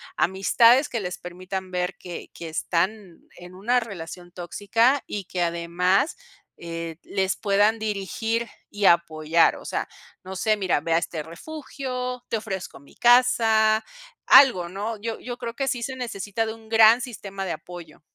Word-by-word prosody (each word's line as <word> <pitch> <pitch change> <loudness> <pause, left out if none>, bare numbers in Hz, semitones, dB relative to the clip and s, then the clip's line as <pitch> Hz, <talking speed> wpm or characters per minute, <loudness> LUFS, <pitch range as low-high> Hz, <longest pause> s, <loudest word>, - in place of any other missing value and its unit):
Amistades 230 +8 +4
que 235 - -3
les 180 -2 -4
permitan 185 +1 -7
ver 180 0 -2
que 175 -2 -8
que 170 - -8
están 175 +3 -2 0.2
en 180 0 -12
una 225 +7 +1
relación 175 -4 -8
tóxica, 205 +9 +1
y 200 -2 -5
que 180 0 -4
además, 175 - +1 0.4
eh, 165 -1 -6
les 190 -1 -1
puedan 205 +2 +2
dirigir 220 +2 -2 0.2
y 205 -1 -2
apoyar. 165 -2 +3
O - - -13
sea, - - -3 0.3
no 190 +1 -7
sé, 215 +2 +2
mira, 190 -7 0
ve 165 +3 -1
a - - +5
este 160 -1 -4
refugio, 250 - -6
te 225 - 0
ofrezco 195 -8 -6
mi 140 - -20
casa, 225 -3 +4 0.4
algo, 185 -11 +7
¿no? 205 +5 -4
Yo, 225 0 -4
yo 245 -1 -6
creo 235 -2 -5
que 270 +2 -2
sí 245 -3 -1
se 260 +2 -4
necesita 225 -3 -3
de 220 - -4
un 220 -1 -16
gran 225 +1 +6
sistema 200 -6 -6
de 180 - -3
apoyo. 170 -1 -9
200 Hz, 160 wpm, -24 LUFS, 175-230 Hz, 0.4 s, algo